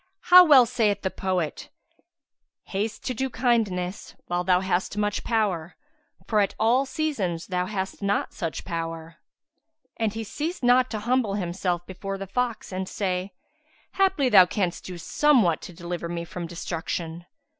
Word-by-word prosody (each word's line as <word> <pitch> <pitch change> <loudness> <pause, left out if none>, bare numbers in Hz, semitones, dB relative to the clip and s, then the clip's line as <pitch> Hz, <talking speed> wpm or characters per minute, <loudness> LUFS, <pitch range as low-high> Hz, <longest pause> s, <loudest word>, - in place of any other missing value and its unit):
How 360 0 +12
well 280 -7 +7
saith 215 -4 0
the 190 - -1
poet, 185 -5 -2 0.9
'Haste 210 +3 -3
to 255 - -1
do 265 +3 -2
kindness 215 -7 -1
while 175 0 -1
thou 180 0 +3
hast 190 +1 -1
much 210 0 -1
power, 190 -7 -1 0.2
* - - -33
For 215 - +2
at 200 - +1
all 245 +5 +3
seasons 230 - -2
thou 180 0 -2
hast 195 -1 -4
not 200 0 0
such 165 -2 -4
power.'" 165 -1 -5 0.8
And 225 -2 0
he 225 +2 -5
ceased 305 - -4
not 250 +1 +4
to 215 - -3
humble 240 -3 +1
himself 175 -2 -2
before 195 +1 -5
the 195 - -5
fox 235 +3 -2
and 185 0 -4
say, 185 -1 -2 0.6
"Haply, 380 -8 +2
thou 190 -5 +8
canst 180 -2 -2
do 180 -1 -7
somewhat 185 - +3
to - - -9
deliver 170 0 -5
me 170 0 -4
from 170 +1 -6
destruction." 170 0 -5
195 Hz, 155 wpm, -25 LUFS, 175-230 Hz, 0.9 s, How